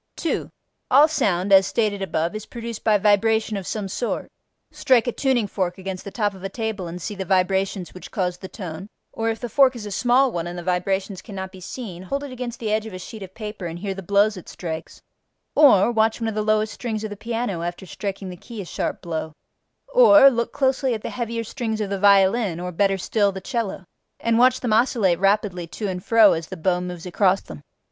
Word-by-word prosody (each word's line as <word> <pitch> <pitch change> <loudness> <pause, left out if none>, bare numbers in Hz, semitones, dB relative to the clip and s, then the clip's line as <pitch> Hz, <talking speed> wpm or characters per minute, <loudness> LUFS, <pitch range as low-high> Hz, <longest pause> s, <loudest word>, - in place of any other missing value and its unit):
2. 335 - -2 0.4
All 285 +4 +7
sound 195 - +1
(as 190 0 +7
stated 210 -3 0
above) 170 -2 -1
is 215 0 -6
produced 235 -2 -7
by 215 -1 +4
vibration 215 +2 +2
of 195 -2 -5
some 210 -3 -3
sort: 235 +5 -3 0.4
strike 250 -4 +3
a 245 - 0
tuning 255 -3 +1
fork 185 -3 -2
against 190 -1 -6
the - - -6
top 205 -1 -1
of 190 -1 -13
a 195 - -3
table 220 -3 -4
and 170 +2 -6
see 210 - -5
the 195 -1 -4
vibrations 190 0 0
which 185 - -10
cause 180 -3 -2
the 190 - -7
tone, 185 -1 -8 0.2
or, 225 0 -1
if 225 - -2
the 240 - -4
fork 265 +1 +4
is 225 -3 -7
a 205 - -6
small 250 +5 +3
one 170 -3 -3
and 175 +1 -6
the 175 - -6
vibrations 190 +2 -1
cannot 190 -2 -7
be 190 -1 -13
seen, 190 -3 -7
hold 275 +10 -3
it 285 - -7
against 250 -1 -6
the 220 -2 -2
edge 215 0 0
of 220 - -9
a - - -5
sheet 210 +4 -9
of 190 -1 -9
paper 210 -4 -6
and 165 0 -6
hear 195 +2 -3
the 195 - -7
blows 200 +3 +2
it 180 - -10
strikes; 160 -3 -7 0.5
or, 245 -8 +6
watch 225 0 +2
one 225 - -2
of 220 - -2
the 215 - -1
lowest 215 0 +1
strings 220 -3 -4
of 215 - -4
the - - -5
piano 225 -4 -3
after 175 +2 -5
striking 195 +1 -5
the - - -8
key 225 +5 -10
a 195 - -5
sharp - - -4
blow; 160 -2 -4 0.6
or, 300 - +8
look 235 -1 -1
closely 265 -2 +1
at 215 - -7
the - - -4
heavier 230 -1 -3
strings 225 -1 -3
of 205 -2 -3
the 200 - -1
violin 200 -1 +4
(or 180 0 -4
better 195 +2 +1
still, 200 +2 +1
the 190 - -6
cello) 210 -3 -3 0.3
and 230 0 +1
watch 255 +1 +4
them 240 -4 0
oscillate 220 -7 +3
rapidly 195 -3 +1
to 205 +5 -5
and 180 -1 -4
fro 225 -2 +6
as 160 -1 -4
the 190 - -7
bow 180 +2 +1
moves 180 -1 -6
across 185 +1 +2
them. 75 -2 -11
205 Hz, 230 wpm, -23 LUFS, 185-230 Hz, 0.6 s, or